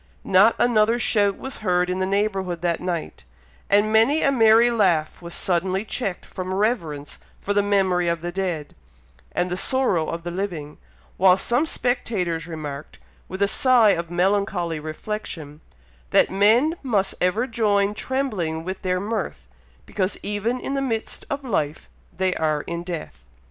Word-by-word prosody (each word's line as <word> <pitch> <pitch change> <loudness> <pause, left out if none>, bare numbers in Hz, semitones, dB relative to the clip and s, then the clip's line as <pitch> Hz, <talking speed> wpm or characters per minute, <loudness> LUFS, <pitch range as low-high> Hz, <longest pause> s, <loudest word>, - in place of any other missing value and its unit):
Not 195 +4 +5
another 230 -1 +3
shout 205 -4 +1
was 265 - -7
heard 180 -3 +1
in 180 +1 -2
the 185 - 0
neighbourhood 195 -3 -1
that 170 -2 0
night; 175 -3 -4 0.5
and 205 +2 +3
many 245 +8 +4
a 275 - +4
merry 230 -1 +5
laugh 180 -10 +1
was 170 0 -8
suddenly 190 +2 -1
checked 195 -3 -3
from 185 0 -5
reverence 170 - -2 0.2
for 205 - -2
the 205 - +3
memory 190 -3 +1
of 170 -1 0
the 175 0 -4
dead, 175 -5 -3 0.6
and 180 - -1
the - - 0
sorrow 200 - +1
of 165 0 -5
the 175 - -4
living; 170 -6 -5 0.4
while 185 0 +5
some 240 +10 +1
spectators 185 - -1
remarked, 150 -3 -7 0.3
with 190 +2 -2
a - - +3
sigh 240 0 +5
of 170 -3 -2
melancholy 180 -2 0
reflection, 155 -2 -6 0.5
that - - +4
men 225 - +4
must 205 -8 0
ever 195 +7 +2
join 205 -4 +1
trembling 210 -11 -2
with 185 +2 -5
their 185 -1 0
mirth, 200 - -4 0.4
because 190 -1 -2
even 210 +5 -1
in 270 - -4
the 275 - 0
midst 225 -5 -2
of 280 0 -3
life 155 - -2 0.2
they 185 -1 0
are 155 -2 0
in 170 +2 -5
death. 170 - -7
190 Hz, 160 wpm, -23 LUFS, 170-220 Hz, 0.6 s, Not